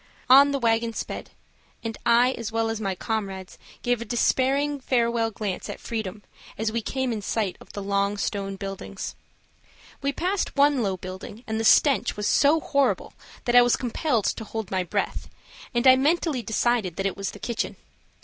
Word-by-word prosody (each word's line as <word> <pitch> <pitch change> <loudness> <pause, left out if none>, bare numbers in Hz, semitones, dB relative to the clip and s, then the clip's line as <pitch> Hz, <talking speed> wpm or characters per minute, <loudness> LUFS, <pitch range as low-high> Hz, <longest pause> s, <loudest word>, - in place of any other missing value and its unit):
On 280 +2 +9
the 280 - 0
wagon 230 -2 +1
sped, - - -5 0.5
and 225 -1 -3
I, 240 +2 +5
as 230 -4 -5
well 225 0 0
as 225 -1 -4
my 195 -2 -1
comrades, 195 -2 -4 0.2
gave 245 -1 +1
a - - -1
despairing 275 +4 +1
farewell 235 -3 +1
glance 205 -3 -4
at - - -6
freedom 215 -3 -5 0.3
as 220 0 -1
we 230 +1 -1
came 260 +2 -2
in 215 - -4
sight 200 -2 -1
of - - -14
the 200 - -5
long 200 +1 0
stone 195 -1 -2
buildings. 195 0 -6 0.9
We 280 0 0
passed 365 +7 -1
one 285 -2 +4
low 195 -4 -1
building, 185 +5 -8
and 220 0 -2
the - - -1
stench 250 0 +4
was 210 - -2
so 295 +8 +4
horrible 280 -2 0 0.3
that 240 -1 +1
I 245 - +10
was 245 0 +4
compelled 245 -2 -1
to - - -1
hold 220 -2 -5
my 190 -1 +1
breath, 180 - -3 0.4
and 240 0 0
I 260 0 +9
mentally 300 -1 +1
decided 220 -4 0
that 195 - -3
it 195 - 0
was 195 -1 -3
the - - -9
kitchen. 235 +2 -3
225 Hz, 185 wpm, -25 LUFS, 200-255 Hz, 0.9 s, I